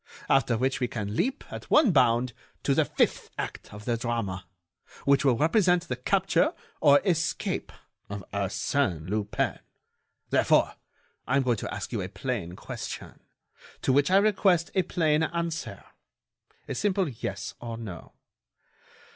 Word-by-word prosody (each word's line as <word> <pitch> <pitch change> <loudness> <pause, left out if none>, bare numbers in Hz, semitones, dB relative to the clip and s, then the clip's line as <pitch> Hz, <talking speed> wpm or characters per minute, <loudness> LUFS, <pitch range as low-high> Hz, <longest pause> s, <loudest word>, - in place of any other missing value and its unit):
after 130 -4 +3
which 130 +3 0
we 125 - +1
can 105 -3 -4
leap, 260 - 0
at - - -8
one 300 -9 +6
bound, 120 -4 +3 0.3
to - - +2
the - - +4
fifth - - 0
act - - -5
of 105 +1 -10
the 120 - +1
drama, 115 -6 -3 0.6
which 140 0 +4
will 130 -4 +4
represent 175 - +3
the 125 - -2
capture 195 - +2 0.2
or 145 -2 +6
escape 165 -4 0 0.4
of 100 -1 -5
Arsène 100 - 0
Lupin. 105 +1 -1 0.7
Therefore, - - +4 0.5
I 130 - +2
am 140 - +3
going 120 -3 +1
to - - -5
ask - - -5
you - - -1
a 90 - -4
plain 100 -3 -3
question, - - -7 0.6
to 130 - +3
which 140 +3 +4
I 190 - +5
request 195 -4 +3
a 190 - +3
plain 160 -3 +1
answer—a 170 0 -6
simple 195 -3 +1
yes 120 -6 -5
or 115 -1 -5
no. 100 -7 -8
130 Hz, 145 wpm, -27 LUFS, 110-170 Hz, 0.7 s, one